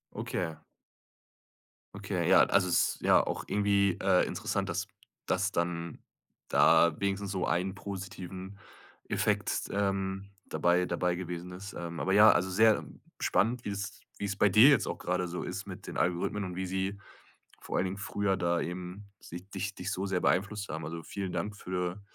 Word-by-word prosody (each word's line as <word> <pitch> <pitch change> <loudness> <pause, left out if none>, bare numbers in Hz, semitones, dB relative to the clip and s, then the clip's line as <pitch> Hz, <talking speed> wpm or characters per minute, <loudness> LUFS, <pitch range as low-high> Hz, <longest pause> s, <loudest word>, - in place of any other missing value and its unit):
Okay. 85 -3 -3 1.4
Okay, - - -2
ja, - - +7
also 95 -2 +3
es 85 - +2
ist - - -20
ja - - +6
auch - - -3
irgendwie, 100 -2 +2
äh, 95 -1 +4
interessant, - - -2
dass - - -2 0.4
das 95 +2 +1
dann 85 -1 -2 0.5
da 80 -1 +5
wenigstens 100 0 -1
so 95 -2 -1
ein 90 +3 0
positiven 95 -1 -7 0.5
Effekt, - - 0
ähm, 95 0 -1
dabei 90 +1 +2
dabei 90 -1 0
gewesen 90 0 -6
ist. 100 +3 -8
Ähm, 85 -1 -6
aber 95 - 0
ja, 105 +1 +8
also 95 0 +1
sehr 110 +3 +4 0.4
spannend, 115 +5 +1
wie - - -4
es 100 -1 -5 0.2
wie - - -3
es 100 0 -2
bei 100 - +4
dir 110 +9 +8
jetzt 140 -7 +4
auch - - -3
gerade 90 0 -1
so 90 +1 -4
ist - - -5
mit - - -8
den - - -6
Algorithmen 90 +4 0
und 90 -1 -6
wie 95 +1 -2
sie 95 +2 -2 0.6
vor - - -3
allen 95 - +2
Dingen 95 +2 -3
früher 100 -1 -1
da 85 0 +1
eben 90 +4 -5
sich 90 +3 -10
dich 95 +1 -4
dich 90 +2 -4
so 95 0 -2
sehr 95 -2 0
beeinflusst 100 +3 0
haben. 80 0 -4
Also 80 +1 -6
vielen 95 +2 -5
Dank 90 +4 -3
für 90 0 -3
95 Hz, 175 wpm, -30 LUFS, 90-100 Hz, 1.4 s, ja